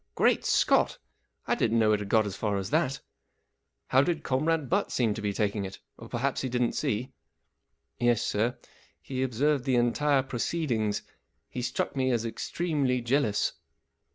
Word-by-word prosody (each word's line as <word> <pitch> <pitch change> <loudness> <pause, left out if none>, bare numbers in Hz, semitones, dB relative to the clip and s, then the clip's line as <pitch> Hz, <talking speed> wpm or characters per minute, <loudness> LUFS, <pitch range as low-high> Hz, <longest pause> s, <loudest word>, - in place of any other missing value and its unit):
" - - -48
Great - - +3
Scott! - - +3 0.5
I - - +1
didn't 115 0 +1
know 110 -1 +4
it 105 - +2
had 100 -1 -6
got 110 0 +4
as 100 -2 -4
far 105 -1 -1
as 95 0 -4
that. 145 -4 +1 0.9
How 130 - +5
did 160 +1 -1
Comrade 155 +3 +1
Butt 200 +6 0
seem 115 -4 +1
to 110 - -6
be 105 -1 0
taking 100 0 -1
it? 95 0 -6 0.2
Or - - -12
perhaps 135 +3 -1
he 130 - -2
didn't 125 -1 +1
see? 120 -8 -1 0.5
" - - -50
44 120 - +1
Yes, 120 -3 +3
sir, 115 +4 0 0.4
he 130 -1 -4
observed 130 +2 +1
the 130 0 +1
entire 135 +3 +2
proceed¬ 135 +4 -2
ings. 110 -3 0 0.5
He 125 - -4
struck 125 +3 -2
me 130 -1 +1
as 120 -2 0
extremely 140 +1 -1
jealous." 120 -3 +1
125 Hz, 180 wpm, -28 LUFS, 110-140 Hz, 0.9 s, How